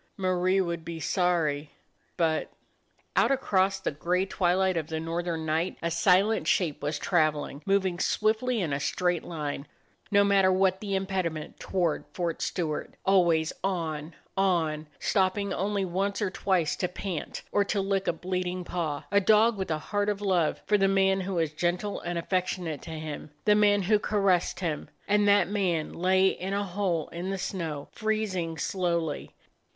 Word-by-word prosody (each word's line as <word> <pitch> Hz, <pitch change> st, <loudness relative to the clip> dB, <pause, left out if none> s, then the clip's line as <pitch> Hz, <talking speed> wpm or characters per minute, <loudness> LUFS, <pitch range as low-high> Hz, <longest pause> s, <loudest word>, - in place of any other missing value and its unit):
Marie 185 Hz, 0 st, +2 dB
would 170 Hz, -3 st, -1 dB
be 165 Hz, 0 st, -6 dB
sorry 160 Hz, -5 st, 0 dB, 0.3 s
— -, -, -42 dB
but 160 Hz, -3 st, +1 dB, 0.3 s
— -, -, -40 dB
Out -, -, +4 dB
across 195 Hz, -8 st, +2 dB
the -, -, -2 dB
gray 175 Hz, +5 st, 0 dB
twilight 185 Hz, 0 st, +1 dB
of 160 Hz, -2 st, -2 dB
the 160 Hz, -1 st, -3 dB
north 165 Hz, +2 st, -3 dB
ern 165 Hz, -2 st, -2 dB
night 160 Hz, +4 st, 0 dB
a 170 Hz, -, 0 dB
silent 190 Hz, +6 st, +3 dB
shape 165 Hz, -6 st, +1 dB
was 150 Hz, +1 st, -1 dB
traveling; 155 Hz, -4 st, 0 dB
moving 190 Hz, -3 st, +1 dB
swiftly 220 Hz, +5 st, +1 dB
in 160 Hz, -6 st, -1 dB
a 140 Hz, -, 0 dB
straight 175 Hz, +3 st, 0 dB
line, 150 Hz, -4 st, -4 dB, 0.4 s
no 200 Hz, 0 st, +5 dB
matter 195 Hz, -2 st, +4 dB
what 190 Hz, 0 st, +2 dB
the 200 Hz, -2 st, -2 dB
impediment, 185 Hz, -5 st, -2 dB
toward 175 Hz, -4 st, 0 dB
Fort 170 Hz, -2 st, -2 dB
Stewart. 160 Hz, -5 st, -2 dB
Always 170 Hz, -4 st, +3 dB
on, 165 Hz, -4 st, -2 dB, 0.2 s
on; 165 Hz, -5 st, +1 dB
stopping 195 Hz, 0 st, +1 dB
only 200 Hz, +1 st, -1 dB
once 195 Hz, +3 st, -1 dB
or 205 Hz, -4 st, -1 dB
twice 185 Hz, -5 st, +1 dB
to 180 Hz, -, 0 dB
pant, 180 Hz, -2 st, -5 dB
or 205 Hz, -, +3 dB
to 200 Hz, -, -1 dB
lick 195 Hz, 0 st, 0 dB
a -, -, +2 dB
bleeding 180 Hz, +1 st, -3 dB
paw; 160 Hz, -5 st, -3 dB
a 200 Hz, 0 st, +4 dB
dog 215 Hz, +3 st, +5 dB
with 190 Hz, -2 st, -4 dB
a 155 Hz, -, +1 dB
heart 205 Hz, +6 st, -1 dB
of 205 Hz, -1 st, -1 dB
love 185 Hz, -6 st, +1 dB
for 210 Hz, -1 st, +3 dB
the 195 Hz, -, +4 dB
man 195 Hz, 0 st, +3 dB
who 190 Hz, 0 st, -3 dB
was 160 Hz, -3 st, 0 dB
gentle 175 Hz, +5 st, -1 dB
and 175 Hz, 0 st, -3 dB
affection 180 Hz, +1 st, -1 dB
ate 155 Hz, -3 st, -4 dB
to -, -, -10 dB
him; 155 Hz, -2 st, -6 dB, 0.2 s
the 210 Hz, -, +6 dB
man 205 Hz, -1 st, +4 dB
who 210 Hz, +3 st, +3 dB
caressed 195 Hz, -4 st, +1 dB
him. 160 Hz, -4 st, -2 dB, 0.2 s
And 205 Hz, 0 st, +3 dB
that 205 Hz, 0 st, +5 dB
man 185 Hz, -6 st, -1 dB
lay 185 Hz, +2 st, +3 dB
in 190 Hz, +1 st, -4 dB
a 200 Hz, -, 0 dB
hole 180 Hz, -4 st, -1 dB
in 175 Hz, +3 st, -5 dB
the 195 Hz, -, -2 dB
snow, 165 Hz, -6 st, -4 dB
freezing 205 Hz, -7 st, -2 dB
slowly. 170 Hz, -2 st, -2 dB
185 Hz, 175 wpm, -28 LUFS, 165-195 Hz, 0.4 s, the